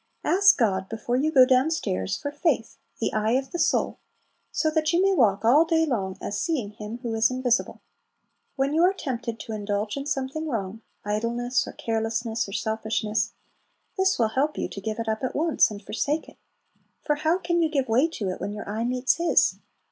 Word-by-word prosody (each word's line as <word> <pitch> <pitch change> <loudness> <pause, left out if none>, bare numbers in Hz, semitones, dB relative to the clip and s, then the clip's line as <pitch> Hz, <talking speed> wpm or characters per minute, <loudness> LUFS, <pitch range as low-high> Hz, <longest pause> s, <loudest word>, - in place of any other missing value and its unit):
Ask 395 +3 +5
God, 190 -5 +1
before 225 +2 -2
you 295 +5 +1
go 260 -4 +7
down 255 +3 +3
stairs, 95 - -2
for 285 - -4
faith, 290 -6 -1 0.2
"the 225 - -1
eye 215 +1 +1
of 265 +1 -1
the 345 - -4
soul," - - +1 0.5
so 315 - +1
that 310 0 +1
you 340 - +2
may 390 +1 +4
walk 215 - +2
all 280 +8 +6
day 325 -1 +2
long 195 -9 -2
"as 205 +1 -3
seeing 265 -12 -1
Him 210 +2 -7
who 235 -2 -2
is 225 0 +3
invisible." 255 -2 0 0.7
When 275 +1 0
you 320 - +3
are 365 +2 +5
tempted 240 -7 -4
to - - -7
indulge 210 0 -2
in 280 0 -5
something 295 +2 -2
wrong, 220 -5 -4 0.2
idleness 235 +4 -1
or - - -7
carelessness, 225 -1 -2
or - - -8
selfishness, 220 0 -1 0.6
this 380 0 +2
will 225 -2 +2
help 280 +6 0
you - - -1
to 200 - -7
give 215 +2 -3
it 230 -1 -4
up 220 +3 -2
at 255 - -2
once, 320 +1 +3
and 205 -1 -9
forsake 290 +10 -2
it; - - -16 0.7
for 295 -2 0
how 315 +3 +2
can 345 -2 0
you 320 - +2
give 275 -4 0
way 245 +7 +3
to 220 - -4
it 185 - -5
when 205 - -3
your 210 - -7
eye 215 +3 -2
meets 250 +3 +1
His? 340 0 +3
245 Hz, 205 wpm, -25 LUFS, 220-305 Hz, 0.7 s, go